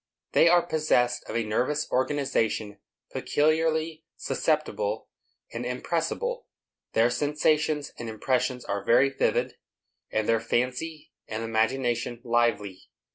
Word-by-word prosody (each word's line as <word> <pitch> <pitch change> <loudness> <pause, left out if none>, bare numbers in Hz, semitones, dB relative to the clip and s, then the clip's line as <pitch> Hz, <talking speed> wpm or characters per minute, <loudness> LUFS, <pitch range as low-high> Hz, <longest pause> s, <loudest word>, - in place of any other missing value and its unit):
They 170 - +6
are 175 0 +5
possessed 125 -7 +1
of - - -4
a 115 - +1
nervous 130 +8 0
organization 120 -6 0 0.3
peculiarly 160 +1 +1
susceptible 485 +1 -1 0.4
and - - -4
impressible. - - -2 0.5
Their 115 +2 +4
sensations 150 +2 +1
and 115 - -5
impressions 125 +3 -1
are 100 -1 -2
very 130 +4 +5
vivid, - - 0 0.5
and 110 -1 -1
their 115 0 +3
fancy 130 +8 -2 0.2
and 110 +1 -4
imagination 120 +1 0
lively. 115 -5 0
125 Hz, 110 wpm, -27 LUFS, 115-155 Hz, 0.5 s, They